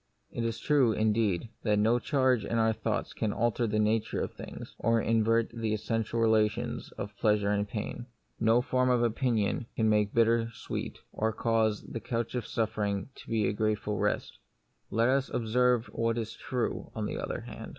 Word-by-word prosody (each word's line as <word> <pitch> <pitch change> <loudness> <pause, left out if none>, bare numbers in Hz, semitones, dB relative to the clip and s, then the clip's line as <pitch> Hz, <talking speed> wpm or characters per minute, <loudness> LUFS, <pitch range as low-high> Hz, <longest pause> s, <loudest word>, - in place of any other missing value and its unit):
It 120 - -3
is 115 -1 -1
true, 135 -7 +3
indeed, 110 -2 +1
that 105 -2 +2
no 110 +4 +3
change 130 -3 +2
in 115 - -1
our 110 0 +3
thoughts - - -2
can 110 - -1
alter 120 +2 +1
the 105 0 0
nature 110 +1 +1
of - - -3
things, - - -9
or 115 0 +3
invert 115 0 +2
the 115 -2 -1
essential 115 +2 -2
relations 110 -2 +1
of 100 +1 -6
pleasure 105 -1 +2
and 105 0 0
pain. 115 +3 -5 0.3
No 115 +2 +4
form 130 0 +1
of 125 -1 +3
opinion 115 -2 0
can 110 -1 +2
make 105 -1 +2
bitter 115 0 +3
sweet, - - -5 0.2
or 110 +1 0
cause 110 -1 +1
the 115 - -6
couch 115 0 -3
of 125 -3 -3
suffering 105 -2 -1
to - - -14
be 110 -3 +1
a - - 0
grateful 105 0 -1
rest. - - -1 0.5
Yet - - -7
let 115 +2 +4
us 135 0 +2
observe 125 +1 +2
what 115 0 0
is 115 -2 -3
true, 125 -2 -3
on 110 -2 -2
the - - -3
other - - -3
hand. - - -8
115 Hz, 185 wpm, -30 LUFS, 105-115 Hz, 0.5 s, No